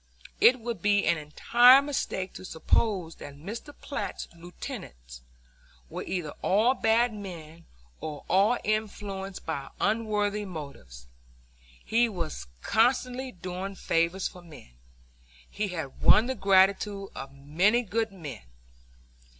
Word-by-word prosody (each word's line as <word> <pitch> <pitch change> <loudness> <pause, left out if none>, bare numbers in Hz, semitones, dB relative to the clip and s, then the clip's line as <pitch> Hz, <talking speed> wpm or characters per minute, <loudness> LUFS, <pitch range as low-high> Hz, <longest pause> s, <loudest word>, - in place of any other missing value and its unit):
It 250 +1 +6
would 235 -1 -5
be 205 0 +3
an 170 - +2
entire 240 - +6
mistake 275 -9 -3
to - - -9
suppose 180 0 0
that 140 - -9
Mr. 210 - -7
Platt's 280 - -4
lieutenants 65 - -9 0.7
were - - -4
either 175 -5 -3
all 220 +6 +3
bad 235 -1 +2
men 170 -5 -9 0.3
or 150 -2 -6
all 205 +6 +4
influenced 200 -2 -3
by 140 -4 -4
unworthy 210 -1 0
motives. 140 - -9 0.8
He 235 +1 +3
was 165 - -5 0.2
constantly 250 +2 +1
doing 185 +1 -6
favors 170 +2 0
for 180 - -12
men. 155 - -14 0.8
He 210 0 -3
had 160 -7 -6
won 220 - +6
the 260 - -1
gratitude 195 -1 +3
of 135 0 -7
many 175 - +2
good 225 +1 -1
men. 160 - -8
195 Hz, 120 wpm, -28 LUFS, 165-220 Hz, 0.8 s, It